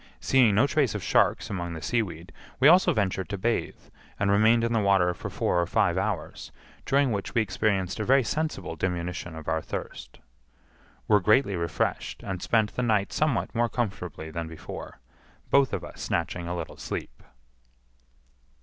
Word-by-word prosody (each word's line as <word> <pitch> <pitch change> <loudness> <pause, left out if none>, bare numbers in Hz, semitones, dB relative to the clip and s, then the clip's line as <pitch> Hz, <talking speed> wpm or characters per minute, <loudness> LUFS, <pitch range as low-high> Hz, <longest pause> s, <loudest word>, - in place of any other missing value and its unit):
Seeing 125 -6 +4
no 110 +7 +5
trace 140 - +1
of - - -4
sharks - - +2
among 85 -3 -3
the 80 - -7
seaweed, 95 -8 -2 0.3
we 135 - +6
also 180 +4 +6
ventured 95 -4 -1
to 100 - -3
bathe, 115 +5 -1 0.4
and 100 0 +2
remained 110 +3 +4
in 115 0 0
the 115 - +3
water 95 -3 +3
for - - -7
four 90 - 0
or 85 - -1
five 85 0 +2
hours, 95 -4 -3 0.4
during 140 -1 +3
which 100 +3 -4
we 115 - +4
experienced 95 -1 -1
a - - 0
very 135 +3 +4
sensible 120 - -3
diminution 85 -1 -3
of 80 -1 -9
our 80 0 0
thirst. - - -7 0.9
Were 105 -1 +5
greatly 105 +1 +3
refreshed, 85 -3 -2
and 95 -3 -4
spent 110 -3 +1
the - - -1
night 105 -5 +1
somewhat 150 -5 0
more 120 0 +1
comfortably 90 - -4
than 85 0 -4
before, 80 0 -9 0.5
both 140 -1 +4
of - - -3
us - - -10
snatching 85 +1 -2
a 90 - -3
little - - -6
sleep. - - -6
100 Hz, 170 wpm, -27 LUFS, 90-115 Hz, 0.9 s, we